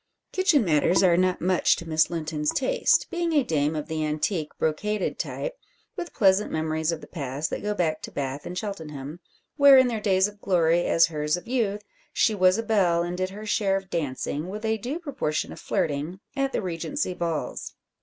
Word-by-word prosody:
Kitchen 360 - +3
matters 170 +3 +3
are 175 -2 +5
not 185 +1 +1
much 180 +1 +3
to 170 - -8
Miss 155 -1 +2
Linton's 155 -2 -2
taste, 295 +4 +2
being 345 -1 -1
a 290 -3 +4
dame 155 -5 0
of 150 - -4
the 160 -1 -2
antique 155 +1 -1
brocaded 200 +6 -1
type, - - -4 0.4
with 345 - -5
pleasant 195 -2 +3
memories 160 0 -1
of 165 -2 -4
the - - -11
past, 145 -1 -4
that - - -3
go 210 0 -2
back 160 -4 0
to - - -7
Bath 140 0 -4
and 180 - -6
Cheltenham; 160 -7 -6 0.4
where, 280 -2 +8
in 260 -1 +5
their 225 -3 -3
days 190 -2 +3
of 210 0 -13
glory, 175 -2 +2
as 165 - +5
hers 150 0 -1
of 180 - -11
youth, 215 -5 -1 0.3
she 220 - +2
was 185 -1 +4
a 225 - -1
belle, 185 -7 +2
and 175 +1 -3
did 185 +1 -2
her 210 +3 -9
share 205 -2 +1
of 195 0 -9
dancing, 150 +1 -3
with 210 +3 -6
a 220 0 0
due 255 +9 -3
proportion 275 - -3
of - - -11
flirting, 150 +5 -2 0.2
at 275 -1 0
the - - -2
Regency 185 - -2
balls. 170 -3 -4
180 Hz, 200 wpm, -25 LUFS, 155-215 Hz, 0.4 s, where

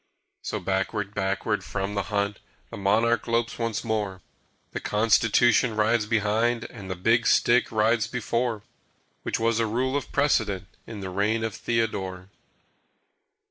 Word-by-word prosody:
So - - -3
backward, 95 +2 -2
backward 95 +1 -1
from 100 0 -3
the 100 - 0
hunt 100 -1 -1 0.3
The - - -7
monarch 115 +5 +2
lopes 115 0 0
once 115 -2 -2
more. 105 -5 -2 0.5
The - - -4
Constitution 115 +2 +3
rides 110 0 +2
behind 110 +2 +1
And 100 -5 -9
the 95 - -2
Big 115 +6 +2
Stick 120 +1 +3
rides 110 +1 +2
before 115 -2 -2 0.6
(Which - - -2
was 115 0 +1
a 115 - +1
rule 130 +5 -1
of 145 - -3
precedent 110 -10 +1 0.2
In 110 -3 -7
the 95 -1 -5
reign 105 +4 0
of 110 -2 -2
Theodore). 95 -6 -2
110 Hz, 140 wpm, -26 LUFS, 100-115 Hz, 0.6 s, Constitution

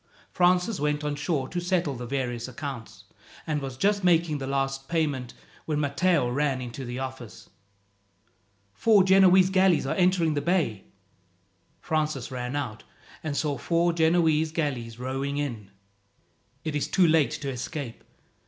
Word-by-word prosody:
Francis 180 +3 +2
went 150 +1 0
on 150 -1 -1
shore 145 -3 -1
to 175 +4 -3
settle 175 -4 0
the 120 -1 -7
various 125 -2 -3
accounts, 130 -2 -7 0.4
and 150 -2 -1
was 135 -2 -6
just 200 +6 +1
making 165 -4 +3
the 135 - -5
last 135 0 -2
payment 145 -7 -1 0.3
when 150 -2 -1
Matteo 150 0 +2
ran 135 +1 0
into 125 +1 -6
the 120 +1 -5
office. 130 -3 -7 1.2
"Four 205 - +4
Genoese 190 0 +5
galleys 185 -6 +3
are 135 - -1
entering 180 -3 +2
the 145 - -1
bay!" 160 - 0 1.0
Francis 155 -6 -2
ran 125 +1 -4
out, 125 -7 -4 0.4
and 150 -3 -3
saw 145 -3 -1
four 170 0 +1
Genoese 160 -1 +2
galleys 130 -8 -3
rowing 135 +3 -3
in. 120 -9 -4 0.9
"It 155 -2 -3
is 145 - 0
too 185 -3 +3
late 155 -3 +4
to 140 - -4
escape. 130 0 -6
145 Hz, 145 wpm, -26 LUFS, 130-170 Hz, 1.2 s, Genoese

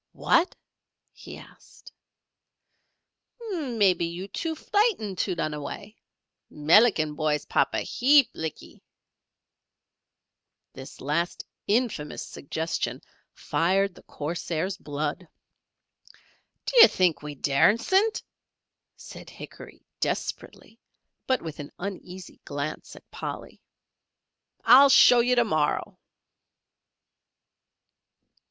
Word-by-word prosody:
"Wot!" 340 +3 +1 0.6
he - - -11
asked. - - -17 1.6
"Mebbee 230 - +1
you 180 +3 -7
too 320 - -4
frightened 360 - 0
to 185 - -1
lun 155 -2 -2
away. 150 +9 -8 0.5
Melican 155 0 +3
boy's 150 -1 -1
papa - - 0
heap 270 0 +3
lickee." 160 -2 -7 1.9
This 135 - -11
last 155 +6 -2 0.2
infamous 210 -9 -1
suggestion 160 +3 -4 0.3
fired 195 +3 0
the - - -16
corsair's 170 +4 -4
blood. 150 +1 -5 1.4
"Dy'ar 475 -2 +8
think 180 -4 +1
we 150 0 -7
daresent," 230 - +2 0.7
said - - -12
Hickory, - - -12
desperately, - - -5 0.5
but 260 -1 0
with 160 -2 -7
an 145 - -8
uneasy 185 -1 -8
glance 145 +2 -6
at - - -17
Polly. - - -7 1.0
"I'll 280 +1 +8
show 250 -2 +7
yer 245 +1 +2
to 240 - +4
morrow." 155 -7 -1
185 Hz, 90 wpm, -26 LUFS, 155-240 Hz, 1.9 s, Dy'ar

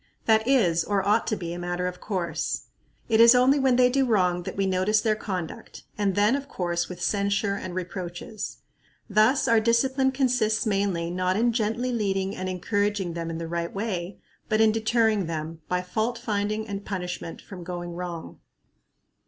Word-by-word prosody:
That 220 0 +3
is, 180 -12 +3
or 200 0 0
ought 210 +3 +3
to 215 - +1
be, 170 -4 -5
a 175 - -6
matter 175 +1 -2
of 180 0 -4
course. 170 -6 -2 0.4
It 225 -1 +4
is 235 +2 +8
only 260 +3 +5
when 265 -2 +3
they 250 0 +5
do 270 +2 +2
wrong 180 -6 +2
that - - -9
we 195 - +1
notice 190 +3 +2
their 215 0 +1
conduct, 185 -6 -6
and 200 -3 0
then, 210 +5 +4
of 280 0 -5
course, 175 -1 -2
with 180 -1 -7
censure 200 0 +1
and 185 -2 -5
reproaches. 185 +4 -5 0.5
Thus 220 +5 +3
our 230 -1 +5
discipline 260 +4 +2
consists 250 -5 +1
mainly, 195 -5 0
not 185 +1 0
in 235 +1 +2
gently 235 +2 0
leading 195 -4 -1
and 185 0 -4
encouraging 205 0 -1
them 165 0 -4
in 165 - -4
the 165 0 -5
right 170 0 -3
way, 195 -3 -3 0.3
but 215 - +2
in 220 -1 +5
deterring 220 -3 +2
them, 160 0 -5
by 180 0 -1
fault 220 +6 -1
finding 215 -1 -2
and 200 -1 -5
punishment, 180 -4 -5
from 185 -3 -10
going 175 0 -5
wrong. 175 -1 -6
200 Hz, 180 wpm, -26 LUFS, 180-225 Hz, 0.5 s, is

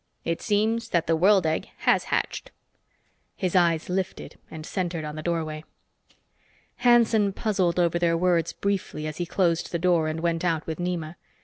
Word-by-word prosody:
It 165 0 -2
seems 225 +2 0
that 170 -4 +1
the 165 - +2
world 190 +2 +4
egg 160 0 -1
has - - +3
hatched." - - -2 0.9
His 185 -2 -2
eyes 170 -3 +3
lifted 185 0 -4
and 155 -2 -8
centered 175 -4 -3
on 150 0 -6
the 155 - -5
doorway. 155 -2 -3 1.1
Hanson 235 -4 +4
puzzled 185 -5 0
over 170 -1 +2
their 170 -1 +2
words 175 -1 +1
briefly 195 -6 -3
as 155 0 -5
he 175 - -3
closed 170 -2 0
the 170 - 0
door 170 -2 +2
and 155 +1 -3
went 170 0 0
out 165 -3 0
with 160 +1 -5
Nema. 175 -2 -3
175 Hz, 170 wpm, -25 LUFS, 165-190 Hz, 1.1 s, world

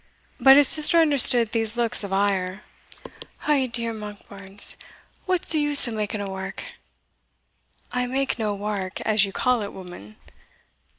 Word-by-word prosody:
But 270 +1 +5
his 290 -2 +3
sister 310 +4 +1
understood 265 -7 +6
these 225 0 -4
looks 235 -3 -2
of 200 - -8
ire. 195 -1 -3 0.8
"Ou 280 -4 0
dear! 230 -1 -4
Monkbarns, 205 -2 -9 0.5
what's 370 -2 -2
the 315 - +1
use 295 -2 +8
of 235 - -7
making 210 -1 -5
a 200 - -7
wark?" 190 0 -9 1.3
"I 250 0 -4
make 265 -1 -4
no 210 -2 -4
wark, 200 -2 -7
as 210 -2 0
ye - - -10
call 250 +2 -2
it, 205 - -8
woman." 175 - -14
220 Hz, 145 wpm, -21 LUFS, 200-255 Hz, 1.3 s, use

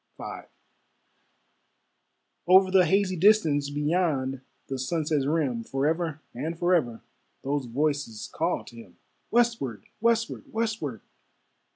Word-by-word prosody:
V - - -7 2.1
Over 185 +1 +6
the 185 -1 +5
hazy 195 -1 +2
distance, 160 -7 +3
Beyond 145 -3 0 0.2
the 135 -1 -5
sunset's 150 0 0
rim, 140 -7 0
Forever 155 +4 -1
and 155 +7 -4
forever 165 -11 +1 0.4
Those 140 -1 -1
voices 140 -3 -2
called 165 +3 -1
to 120 - -15
him. 100 -6 -13 0.3
Westward! 230 - 0
westward! 230 0 0
westward! 215 - -2
155 Hz, 100 wpm, -27 LUFS, 135-185 Hz, 2.1 s, Over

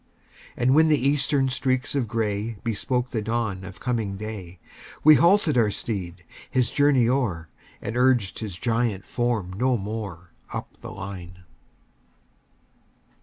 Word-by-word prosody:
And 125 +2 +3
when 160 +2 +6
the 155 -1 +4
Eastern 140 0 +2
streaks 130 0 -1
of 135 -5 0
gray 110 0 -2
Bespoke 125 +2 -1
the 110 - -1
dawn 110 -4 -2
of 95 -1 -10
coming 110 -6 -2
day, 95 -4 -7 0.4
We 155 - +9
halted 170 -4 +4
our 110 -3 +3
steed, 90 -5 -4 0.3
his 125 -3 +1
journey 145 -5 +4
o'er, 110 - 0 0.3
And 110 - -4
urged 125 -5 +2
his 105 -6 -5
giant 115 -3 0
form 115 -7 -1
no 125 +5 +1
more, 100 -4 -6 0.2
Up - - -5
the - - -10
line. 90 -2 -8
115 Hz, 135 wpm, -25 LUFS, 100-130 Hz, 0.4 s, We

